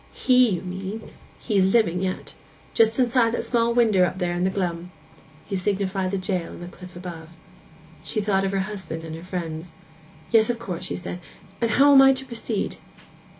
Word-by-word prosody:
—he, 250 -2 +4
you 180 -4 -1
mean; 190 +4 -6 0.3
he's 205 -5 +1
living 190 -3 +2
yet. 185 -1 -3 0.4
Just 225 0 +3
inside 245 -2 +3
that - - 0
little - - -5
small 235 -1 +2
winder 220 -6 +4
up 180 +1 0
there 175 -2 -1
in 175 +1 -1
the 190 - +3
glum.' 180 -2 -3 0.6
He 200 - -4
signified 190 0 -1
the 195 - -1
jail 185 -2 -2
on - - -10
the 175 - -7
cliff 180 0 -12
above. 170 -3 -8 0.7
She 220 - -2
thought 200 -2 +1
of 195 - 0
her 195 -1 0
husband 190 -5 -5
and 160 -1 -6
her 165 - -9
friends. 170 -2 -5 0.6
'Yes, 225 -1 +5
of 240 - 0
course,' 185 -6 -5
she - - -3
said; 180 0 -6 0.4
'and 230 - +2
how 280 +5 +5
am 270 - +9
I 270 0 +7
to 265 0 -5
proceed? 230 -4 -3
195 Hz, 195 wpm, -24 LUFS, 180-230 Hz, 0.7 s, am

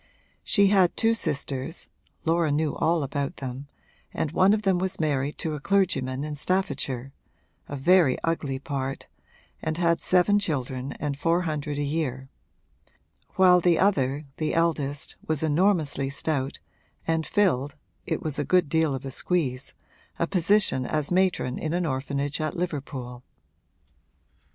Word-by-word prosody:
She 200 -2 +4
had 190 -3 +3
two 225 0 +3
sisters 145 -5 -2 0.4
(Laura 165 -1 +2
knew 150 +1 0
all 165 -1 +1
about 140 0 -3
them) 130 +1 -6 0.4
and 150 - -2
one 185 +3 +4
of 215 0 +1
them 190 -3 +2
was 190 +1 -2
married 145 -2 0
to 160 - -3
a 150 - -4
clergyman 145 -8 0
in 150 0 -4
Staffordshire 135 -6 -2 0.6
(a 145 - -4
very 160 -1 +4
ugly 150 -5 -1
part) 135 -1 -4 0.6
and 160 0 -2
had 170 -1 +2
seven 185 +3 +3
children 135 -7 -3
and 145 -1 -3
four 170 +4 +2
hundred 150 -3 -3
a 145 - 0
year; 140 -3 -2 1.1
while 180 -1 +6
the 170 -1 +4
other, 145 -7 +1
the 155 - -1
eldest, 150 -4 0
was 155 -1 0
enormously 160 -4 +2
stout 140 -1 -2 0.5
and 160 0 +1
filled 145 -9 +1 0.3
(it - - -2
was 150 -2 -3
a - - +1
good 180 0 +2
deal 160 -3 +2
of 135 - -7
a 135 - -4
squeeze) 135 -4 -1 0.4
a 170 - +1
position 190 -5 +2
as 150 +4 -1
matron 180 -8 +1
in 155 0 -2
an 175 0 0
orphanage 140 +1 -2
at 155 +3 -2
Liverpool. 135 -7 -4
155 Hz, 145 wpm, -26 LUFS, 140-175 Hz, 1.1 s, while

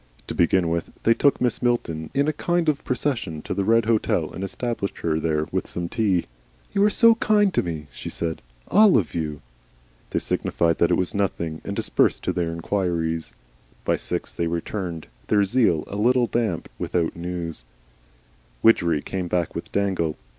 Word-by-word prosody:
To - - -5
begin 85 +1 +3
with 85 0 -1
they 115 - +5
took 140 +4 +3
Mrs. 125 -3 0
Milton 80 -11 -1
in 140 +2 +2
a 155 - +1
kind 175 +2 0
of 145 -2 -1
procession 120 - -2
to - - -3
the 100 +1 0
Red 115 +2 +3
Hotel 110 -1 +1
and 95 - -5
established 105 +1 -3
her 80 -1 0
there 75 -1 0
with - - -1
some 85 -1 -3
tea. 100 -4 +1 0.5
"You 200 -1 +3
are - - +5
so 230 +2 +6
kind 210 -3 +2
to - - +3
me," 80 -4 -5
she - - -7
said. 80 -1 -3 0.3
"All 210 - +6
of 95 -8 -1
you." 75 -3 -3 0.7
They - - -2
signified 85 -1 0
that 85 - +4
it - - +3
was 90 - -1
nothing, 85 -5 -2
and - - -4
dispersed - - +1
to - - 0
their 85 -2 -1
inquiries. 85 -2 -1 0.5
By - - +2
six - - -2
they 85 - -1
returned, 85 0 -4 0.2
their 105 -1 +4
zeal 100 -7 +2
a - - -7
little 120 +3 +3
damped, 115 -8 -1
without 85 -2 -1
news. 85 -4 -5 1.0
Widgery 85 -9 +4
came 95 -2 -3
back 85 -1 -1
with - - -6
Dangle. 95 -6 0
90 Hz, 180 wpm, -24 LUFS, 85-115 Hz, 1.0 s, so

